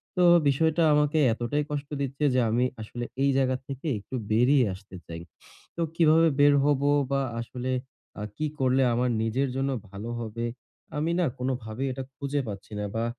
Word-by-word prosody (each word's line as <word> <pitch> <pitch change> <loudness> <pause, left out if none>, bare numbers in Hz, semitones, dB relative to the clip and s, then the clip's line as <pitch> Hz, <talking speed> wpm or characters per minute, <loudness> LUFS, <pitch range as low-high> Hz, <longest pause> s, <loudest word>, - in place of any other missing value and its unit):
তো 180 - +3 0.3
বিষয়টা 160 +4 +2
আমাকে 150 +1 +2 0.2
এতটাই 120 +6 -1
কষ্ট 145 0 -3
দিচ্ছে 140 +2 -1
যে - - +4
আমি 120 +3 +2 0.2
আসলে 120 +3 -5 0.2
এই 140 - +4
জায়গা 130 -1 +2
থেকে 135 +3 -6
একটু 105 - -8 0.2
বেরিয়ে 125 +4 +4
আসতে 95 -1 -14
চাই। 85 0 -7 0.6
তো - - -1
কিভাবে 165 0 +5
বের 145 0 +6
হবো 145 -1 +2 0.2
বা 140 0 +2 0.2
আসলে 125 +2 -4 0.5
আ - - -3
কি 155 - 0
করলে 130 0 +3
আমার 125 +1 +1
নিজের 130 +5 0
জন্য 135 +1 0 0.2
ভালো 100 +4 -7
হবে? 115 +1 -4 0.5
আমি 160 +3 0
না 175 - +3
কোনভাবেই 125 -1 -3
এটা 135 - -5
খুঁজে 140 0 -2
পাচ্ছি 100 +1 -8
না 105 - -2
বা 115 +1 0
135 Hz, 175 wpm, -27 LUFS, 120-145 Hz, 0.6 s, বের